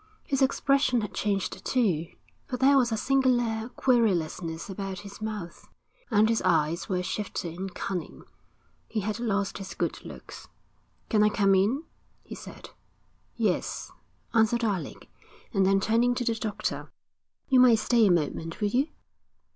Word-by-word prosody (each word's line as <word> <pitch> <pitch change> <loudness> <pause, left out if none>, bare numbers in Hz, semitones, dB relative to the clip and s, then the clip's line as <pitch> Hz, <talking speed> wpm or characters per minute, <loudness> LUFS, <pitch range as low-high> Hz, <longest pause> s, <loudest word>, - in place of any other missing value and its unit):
His 275 -1 -1
expression 270 -2 +2
had 210 - -5
changed 200 -2 -2
too, 185 - +1 0.4
for 250 - -3
there 270 +2 +5
was 250 -3 +3
a 220 - 0
singular 240 -3 +1
querulousness 180 -10 0
about 195 -1 -5
his 200 +1 -11
mouth, 210 -6 -6 0.4
and 215 -2 +4
his 230 0 +1
eyes 165 +1 +1
were 180 -2 0
shifty 180 -4 -4
and 190 +2 -5
cunning. 180 -4 -5 0.6
He 215 - -2
had 215 +3 -3
lost 205 -4 -1
his 195 -1 -7
good - - -2
looks. - - -10 0.6
'Can 215 -3 +3
I 210 - +5
come 200 -2 +3
in?' 210 +11 +2 0.4
he - - -10
said. - - -10 0.6
'Yes,' - - -1 0.4
answered 230 +1 +3
Alec, 200 -6 -3 0.5
and 195 -3 +3
then 195 0 +4
turning 230 +4 +2
to 245 - -1
the 230 - +2
doctor: 220 -2 -4 0.6
'You 260 -2 +4
might 250 -2 +7
stay 225 0 +3
a - - +4
moment, 165 0 -1
will 210 -2 +1
you?' 260 +7 +1
215 Hz, 150 wpm, -27 LUFS, 190-240 Hz, 0.6 s, might